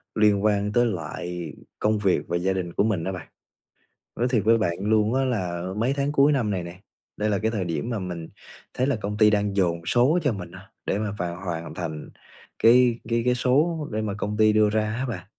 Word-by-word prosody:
liên 105 -2 +3
quan 105 -1 +1
tới 120 +2 +3
lại 85 -4 -4 0.3
công 105 0 +1
việc 95 -3 +2
và 85 - 0
gia 95 +2 0
đình 90 -2 -4
của - - +2
mình 105 -6 0
đó 95 - -2
bạn. 90 -3 -7 0.9
Nói 120 - +2
thiệt 115 -5 +1
với 115 +1 +5
bạn 85 -6 -1
luôn 110 +2 +2
á 135 0 +1
là 90 -9 -2
mấy 120 +5 +1
tháng 140 0 -1
cuối 145 0 +4
năm 120 -7 +1
này 95 -3 -2
nè, 85 +2 -9 0.4
đây 105 +1 0
là 100 - +1
cái 110 +1 0
thời 105 -5 -2
điểm 85 +7 -3
mà 115 -3 -2
mình 90 -3 -6 0.4
thấy 130 - 0
là 140 - +1
công 105 -1 -4
ty 110 -1 +6
đang 105 -1 0
dồn 85 -4 +1
số 130 - +3
cho 145 -5 +2
mình 95 -3 -7
á, - - -14
để - - 0
mà 105 -2 -2
vào 85 +1 -4
hoàn 85 -3 -4
thành 80 -3 -5 0.5
cái 120 0 +5
cái 115 0 +1
cái 125 - +3
số 150 +5 +1
để 110 - -1
mà 105 -2 -2
công 105 0 -3
ty 110 0 +4
đưa 110 -1 +4
ra 110 0 0
á 130 +3 -2
bạn. 90 -6 -5
105 Hz, 235 wpm, -25 LUFS, 90-115 Hz, 0.9 s, ty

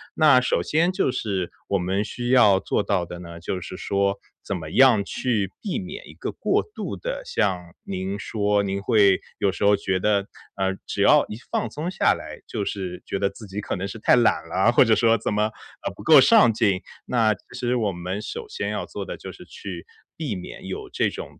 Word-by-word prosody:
那 150 -5 +6
首 125 - +1
先 165 +4 +2
就 185 - +1
是 95 -7 -2 0.2
我 100 - +2
们 95 +3 0
需 120 +3 -5
要 110 -7 +6
做 105 - -1
到 95 -4 0
的 85 +1 -8
呢， 85 -1 -9
就 90 +2 -3
是 90 +1 -8
说 100 +1 0 0.2
怎 100 - -4
么 80 -3 -6
样 125 -6 +5
去 105 -2 -1
避 200 - -2
免 185 0 -8
一 - - -12
个 - - -5
过 - - 0
度 425 - -6
的， - - -4
像 90 - -1
您 95 +1 -4
说 105 -1 0
您 100 0 -2
会 100 -4 +4 0.2
有 100 - +2
时 95 - -5
候 105 0 +6
觉 95 -2 -1
得， 100 0 +1 0.3
呃， 95 0 0
只 - - -3
要 - - +6
一 105 - -7
放 120 - -1
松 155 +9 -4
下 - - +3
来， - - -8
就 105 - -3
是 95 -3 -4
觉 95 - -3
得 100 - +1
自 110 - -12
己 100 +2 -5
可 105 - -3
能 95 - -3
是 110 +3 -8
太 - - +5
懒 120 -8 +2
了， 95 +7 +3
或 125 - +6
者 110 -1 +4
说 115 0 +4
怎 105 - -2
么， 105 +1 +2 0.4
呃， - - -2
不 - - -11
够 - - +8
上 115 - +6
进。 100 -4 +1 0.3
那 115 -3 +3
其 100 - -13 0.2
实 125 0 0
我 110 -5 +1
们 90 +3 -4
首 460 - -6
先 425 - -4
要 - - -3
做 - - -6
的 - - -6
就 - - -8
是 - - -13
去 - - -8 0.3
避 145 -10 -3
免 90 - -8
有 - - -6
这 - - +1
种 - - -9
100 Hz, 240 characters per minute, -24 LUFS, 95-120 Hz, 0.4 s, 够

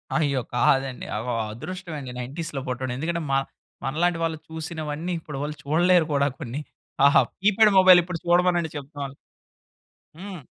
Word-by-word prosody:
అయ్యో! 145 -5 +1
కాదండి 135 0 +2
అవ 110 +2 -3 0.3
అదృష్టం 180 - -7
అండి 130 -3 -7
90స్‌లో 140 +3 -5
పుట్టడం, 130 0 -3
ఎందుకంటే 170 +4 -2
మ - - +1 0.5
మనలాంటి 165 +5 +1
వాళ్ళు 165 -1 -1
చూసినవన్నీ, 160 +1 -4
ఇప్పుడి 150 -3 -8
వాళ్ళు 150 +1 -3
చూడలేరు 175 +3 +4
కూడా 140 0 +3
కొన్ని. 135 -1 -5 0.4
ఆహా! 140 - +7 0.2
కీప్యాడ్ 210 +2 +5
మొబైల్ 185 -1 +8
ఇప్పుడు 175 -1 -5
చూడమనండి 175 -1 +3
చెప్తం. 140 -1 -6 1.1
హ్మ్. 190 -2 -7
160 Hz, 135 wpm, -25 LUFS, 140-175 Hz, 1.1 s, మొబైల్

